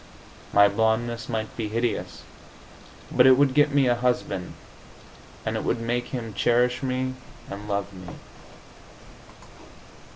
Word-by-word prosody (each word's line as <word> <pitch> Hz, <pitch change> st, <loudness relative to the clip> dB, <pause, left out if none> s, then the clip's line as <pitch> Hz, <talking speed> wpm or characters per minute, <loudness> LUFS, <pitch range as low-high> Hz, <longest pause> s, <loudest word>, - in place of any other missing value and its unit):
My 100 Hz, 0 st, +6 dB
blondeness 110 Hz, +2 st, 0 dB
might 110 Hz, -2 st, -3 dB
be 110 Hz, -3 st, -3 dB
hideous, 115 Hz, +1 st, -2 dB, 0.9 s
but 125 Hz, -, +5 dB
it 130 Hz, -1 st, +7 dB
would 140 Hz, -2 st, +3 dB
get 145 Hz, +1 st, +4 dB
me 140 Hz, -1 st, +3 dB
a 120 Hz, -, +4 dB
husband, 120 Hz, -6 st, -2 dB, 0.9 s
and -, -, -1 dB
it -, -, -2 dB
would 115 Hz, -, 0 dB
make 120 Hz, +1 st, -2 dB
him 115 Hz, -4 st, -5 dB
cherish 120 Hz, +3 st, +2 dB
me 130 Hz, 0 st, -1 dB, 0.4 s
and 100 Hz, +1 st, -7 dB
love 100 Hz, 0 st, -2 dB
me. 90 Hz, -1 st, -11 dB
120 Hz, 130 wpm, -25 LUFS, 110-125 Hz, 0.9 s, it